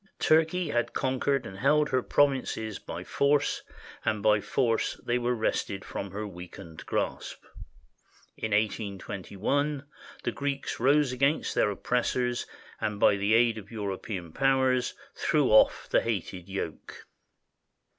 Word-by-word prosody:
Turkey 160 +2 +3
had 120 -3 0
conquered 130 0 0
and 95 -2 -8
held 150 +6 +3
her 130 - +2
provinces 130 -7 +1
by - - -7
force, 140 0 +1 0.4
and 110 -2 -1
by 105 -1 +4
force 115 +1 0
they 120 +1 +1
were 120 0 0
wrested 100 -3 -2
from 100 - -5
her 105 +3 -5
weakened 90 -3 -10
grasp. - - -3 0.9
In 110 - -3
182 100 -2 -2
1, 145 +6 0 0.4
the - - 0
Greeks 140 -1 -3
rose 140 +2 +4
against 135 +4 +1
their - - +3
oppressors 125 +3 -1 0.3
and 105 -1 -2
by 100 - +5
the 100 +2 +2
aid 115 -1 +3
of 100 -1 -13
European 100 -5 -5
powers 130 -2 +2 0.2
threw - - +1
off - - +5
the - - +3
hated 95 -4 -3
yoke. 95 -5 -6
115 Hz, 135 wpm, -28 LUFS, 100-135 Hz, 0.9 s, by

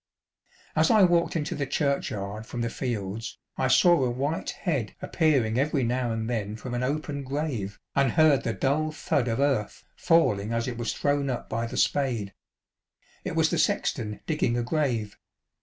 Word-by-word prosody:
As - - +4
I 220 -4 +6
walked 175 -2 +3
into 150 -2 -1
the 140 -2 -2
churchyard 110 -8 -2
from 120 - -4
the 115 0 -1
fields, 115 -3 -4 0.2
I 130 - 0
saw 170 +3 +5
a 125 - +1
white 140 +6 -2
head 140 - -2
appearing 130 -8 +1
every 140 -1 +1
now 120 0 0
and 110 0 -2
then 110 -3 -2
from 120 +2 -7
an 120 - -1
open 145 +2 -2
grave, 130 -8 -3 0.2
and 135 -4 +3
heard 155 -5 +5
the 115 - 0
dull 155 +5 0
thud 145 -4 -1
of 115 +1 -1
earth 135 -7 0
falling 115 - +2
as 115 +1 -1
it 120 -2 -4
was 120 - -1
thrown 145 -1 0
up 125 - -4
by 115 +1 -2
the - - -6
spade. 120 -9 0 0.9
It - - -4
was - - +3
the - - +1
sexton 105 -2 0
digging 140 -7 0
a 120 - 0
grave. 120 -6 -1
125 Hz, 175 wpm, -27 LUFS, 115-145 Hz, 0.9 s, I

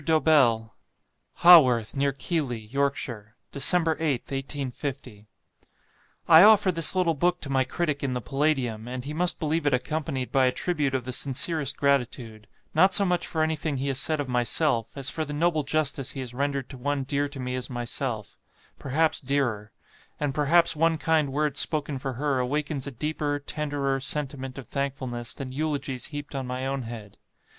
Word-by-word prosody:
DOBELL. 140 -8 +2 0.7
"Haworth, 130 -11 +7
near 140 0 +1
Keighley, 140 -3 -2
Yorkshire, 115 -3 -3 0.2
"Dec. 140 - -4 0.4
8th, 145 -7 -2
1850. 135 -5 -4 1.0
"I 160 0 +8
offer 205 -2 +6
this 165 0 +3
little 180 -3 +2
book 175 +4 0
to 140 - -5
my 135 -1 +2
critic 150 +1 -2
in 135 -2 -1
the 125 - -2
'Palladium,' 130 -4 -1
and 125 +1 -6
he 150 - -5
must 175 +3 +2
believe 160 -1 -1
it 140 - +3
accompanied 135 -1 -3
by 130 -1 +3
a - - +2
tribute 150 -4 -1
of 130 - -2
the 130 +1 -4
sincerest 140 +2 +1
gratitude; 125 -6 -1 0.3
not 185 +4 +5
so 200 - +6
much 180 -2 -1
for 160 -1 -1
anything 155 -2 -2
he 140 +2 -2
has 135 0 0
said 155 +2 +1
of 145 - -3
myself, 125 +1 +1
as 140 +1 0
for 160 - -2
the 150 -1 -6
noble 160 +1 +1
justice 140 -2 0
he 135 - -7
has 125 -2 -6
rendered 140 0 -2
to 130 - -10
one 145 +1 -1
dear 140 +2 -1
to 140 -1 -10
me 125 0 -4
as 125 -1 -4
myself 120 -2 -4 0.4
perhaps 155 +4 0
dearer; 125 -7 -2 0.5
and 145 -2 -1
perhaps 165 +4 +3
one 165 +1 +2
kind 155 -3 +1
word 150 0 -1
spoken 145 -2 -1
for 135 0 -4
her 140 +1 -1
awakens 145 +2 -2
a - - -4
deeper, 150 +2 -3
tenderer, 145 -2 -2
sentiment 135 -1 -2
of 130 -5 -9
thankfulness 130 -4 -4
than 135 -2 -7
eulogies 140 -2 -3
heaped 145 -1 -8
on 135 -2 -4
my 125 +1 -4
own 135 0 -2
head. 115 -4 -9
140 Hz, 175 wpm, -26 LUFS, 130-155 Hz, 1.0 s, I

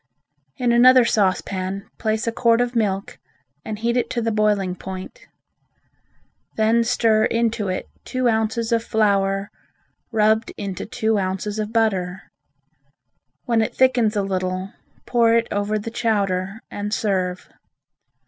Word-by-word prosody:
In 245 -2 +1
another 250 +1 +7
saucepan 195 -2 -1
place 220 0 -1
a 230 - 0
quart 230 0 +3
of 245 0 -1
milk 200 -3 -1 0.4
and 215 - -5
heat 235 +2 -1
it 245 - 0
to 240 - -2
the 230 -1 0
boiling 210 -3 +1
point. 190 - -9 1.3
Then 225 +2 +3
stir 225 -2 +2
into 230 -2 0
it 185 0 -3 0.2
two 255 -1 -1
ounces 225 0 0
of 230 -1 +2
flour 200 -3 +1 0.6
rubbed 220 0 +2
into 195 -3 -5
two 220 -2 0
ounces 195 +3 -3
of 215 0 -3
butter. 195 -5 -1 1.1
When 235 -3 +2
it 220 - -2
thickens 245 -4 +3
a 205 - +1
little, 185 0 -3 0.3
pour 230 -2 +3
it 230 0 +2
over 205 +1 0
the 215 +2 -5
chowder 200 -3 -1
and 205 0 -4
serve. 185 -4 -1
215 Hz, 135 wpm, -22 LUFS, 195-230 Hz, 1.3 s, another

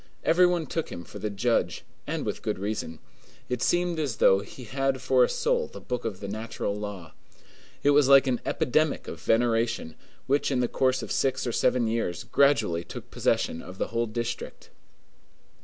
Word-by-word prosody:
Every 180 +2 +5
one 175 -2 0
took 165 +3 -3
him 85 - -6
for - - -10
the 105 - -2
judge, 100 -4 0 0.2
and 155 0 -2
with 105 - -3
good 105 - -2
reason. 100 -5 -4 0.5
It 125 -1 -2
seemed 175 +2 +1
as 140 -7 -1
though 95 -3 +5
he 105 +5 -10
had 135 +3 -1
for - - +3
a 485 - +2
soul 485 0 0
the - - -10
book 125 -2 -4
of 100 -4 -4
the 100 - -5
natural 110 0 -3
law. 100 -6 -7 0.7
It 145 - +5
was 145 -1 +5
like 140 0 +8
an 125 -2 0
epidemic 155 0 0
of 85 - -7
veneration, 115 -6 +1 0.3
which 140 +2 +1
in 135 -3 0
the 125 - +2
course 130 0 +1
of - - -6
six 130 -1 0
or 120 - -1
seven 120 +1 +2
years 110 -6 -1
gradually 110 -12 +2
took - - -10
possession 80 - 0
of 95 +2 -11
the - - -2
whole 115 +1 0
district. 115 +2 -5
120 Hz, 190 wpm, -27 LUFS, 105-140 Hz, 0.7 s, like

